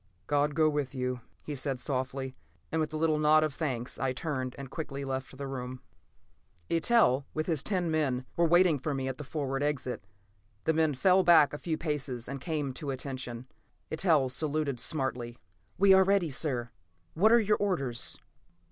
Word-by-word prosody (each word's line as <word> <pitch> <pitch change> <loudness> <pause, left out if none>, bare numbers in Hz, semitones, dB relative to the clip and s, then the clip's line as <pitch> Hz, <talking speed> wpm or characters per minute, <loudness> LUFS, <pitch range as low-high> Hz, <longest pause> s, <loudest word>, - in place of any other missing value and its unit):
"God 145 0 +1
go 155 -1 +4
with 145 -3 -1
you," 125 -1 -2 0.2
he 150 - -5
said 135 -1 -2
softly, 130 0 -2 0.4
and 160 - +1
with 155 - -2
a 155 - -3
little 155 -1 +2
nod 155 +1 +5
of 155 -2 -1
thanks 130 -5 -3
I 130 -1 0
turned 130 -3 -3
and 135 -1 -8
quickly 140 -4 -5
left 130 0 -4
the 140 - -5
room. 130 -1 -5 0.9
Eitel, 165 - +3
with 155 0 -1
his 160 -5 0
ten 180 -3 0
men, 135 -5 0
were 170 0 +3
waiting 175 -3 +5
for 145 +2 -2
me 135 -1 -2
at 130 +1 -4
the - - -4
forward 135 -2 -3
exit. 140 -5 -2 0.6
The 160 - +3
men 160 -2 +2
fell 185 +7 +4
back 165 -5 +6
a 145 - -5
few 160 -2 -2
paces 140 -7 -3
and 140 0 -5
came 150 -3 -2
to 145 +2 -5
attention; 130 -2 -5 0.5
Eitel 155 -5 +3
saluted 150 -2 -1
smartly. 125 -4 -2 0.4
"We 195 0 +6
are 190 0 +7
ready, 190 -4 +2
sir. 125 -4 -1 0.4
What 215 +7 +4
are 235 - +7
your 210 -1 +2
orders?" 140 -12 -1
145 Hz, 180 wpm, -30 LUFS, 130-160 Hz, 0.9 s, are